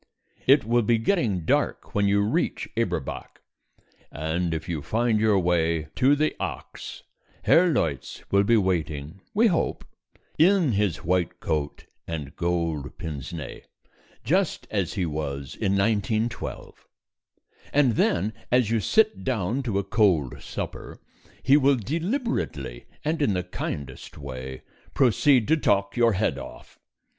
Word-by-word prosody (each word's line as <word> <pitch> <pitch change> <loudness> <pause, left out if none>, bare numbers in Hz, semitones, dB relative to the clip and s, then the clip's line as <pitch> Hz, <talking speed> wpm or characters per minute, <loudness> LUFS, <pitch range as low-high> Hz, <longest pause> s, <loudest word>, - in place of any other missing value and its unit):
It 135 -2 +6
will 120 +2 +3
be 115 +1 +2
getting 110 - 0
dark - - 0
when 100 0 +2
you 100 0 +3
reach 105 - 0
Eberbach, - - -3 0.7
and 80 +3 -2
if 80 0 -4
you 80 -4 -3
find 115 +6 +1
your 110 -2 +3
way 85 -3 +1
to 135 +2 +5
the 155 +1 0
Ox, - - -6 0.4
Herr 180 +2 +5
Leutz 70 - -2
will 100 0 +4
be 115 +3 +4
waiting 80 -3 -1
(we 225 +3 +5
hope) 180 -8 0 0.5
in 175 -3 +5
his 100 -5 0
white 90 0 0
coat 75 -3 -2 0.2
and 75 -3 -5
gold 85 -4 -2
pince 75 -6 -6
nez, 75 -6 -7 0.6
just - - +1
as - - -1
he 90 - -1
was 70 -3 -4
in 100 -3 -1
1912. 110 +3 -1 0.8
And 145 -3 +4
then, 105 -1 +1 0.2
as 125 -3 +3
you 115 - +2
sit 215 - +2
down 120 0 -1
to 115 -7 -2
a 100 - +1
cold 95 - +1
supper, - - -6 0.4
he 140 +2 +6
will, 140 -1 +4
deliberately 165 - -3 0.2
and 160 +1 0
in 105 -9 +2
the 90 - -1
kindest 75 -5 -6
way, 65 -2 -7 0.3
proceed 130 -1 +4
to 160 - +5
talk 100 -8 +1
your 120 -2 +4
head 95 -8 0
off. - - -11
100 Hz, 140 wpm, -25 LUFS, 80-125 Hz, 0.8 s, It